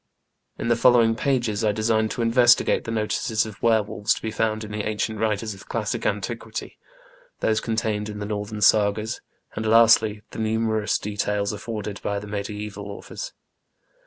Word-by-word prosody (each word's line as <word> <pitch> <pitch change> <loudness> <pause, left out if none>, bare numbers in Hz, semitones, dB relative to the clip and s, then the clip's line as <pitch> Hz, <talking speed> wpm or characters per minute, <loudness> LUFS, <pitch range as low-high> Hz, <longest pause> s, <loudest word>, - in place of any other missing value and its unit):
In - - -3
the 120 - +4
following 115 -1 +5
pages 120 -5 0
I 105 - +3
design 110 +1 +1
to 120 - -2
investigate 120 +1 +4
the - - -5
notices 110 0 0
of 105 -3 -10
were 110 -2 +4
wolves 105 +2 0
to - - -8
be 110 - -2
found 110 0 -1
in 105 - -8
the 105 0 -2
ancient 110 0 -2
writers 110 0 -1
of 95 - -14
classic - - -2
antiquity, - - -4 0.6
those 110 0 +1
contained 110 -2 -1
in 105 - -6
the 105 - -4
Northern 105 0 -4
Sagas, 105 +1 +3 0.3
and, 110 - -3
lastly, 110 -1 +5
the - - -7
numerous 110 -1 0
details 105 0 -2
afforded 105 -1 -5
by 100 - -2
the 100 - -5
mediaeval 105 0 -5
authors. - - -7
110 Hz, 165 wpm, -24 LUFS, 105-115 Hz, 0.6 s, following